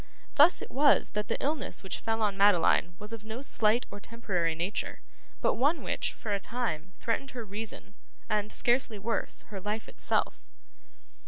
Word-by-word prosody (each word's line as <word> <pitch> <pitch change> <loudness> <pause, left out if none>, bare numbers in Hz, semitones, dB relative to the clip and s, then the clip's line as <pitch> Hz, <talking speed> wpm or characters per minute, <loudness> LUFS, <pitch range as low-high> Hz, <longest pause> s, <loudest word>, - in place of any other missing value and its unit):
Thus 310 +5 +6
it - - -9
was 285 +2 +4
that 210 0 -2
the - - 0
illness 285 -5 -2
which 190 - -4
fell 225 0 0
on 205 -2 +1
Madeline 180 -3 +4
was 210 +3 -8
of 225 -2 -6
no 220 +4 -6
slight 225 -2 +2
or 205 - -7
temporary 185 -8 -1
nature, 180 +6 -2 0.4
but - - +3
one 290 +7 +2
which, - - -1
for 210 - -4
a 200 - +1
time, 190 -7 -3
threatened 235 +4 -1
her 235 - -4
reason, 205 -1 -7 0.3
and 210 -1 0
scarcely 240 -3 +1
worse 220 +4 -2
her 195 -3 -6
life 210 +3 -3
itself. - - 0
215 Hz, 170 wpm, -30 LUFS, 200-235 Hz, 0.4 s, Thus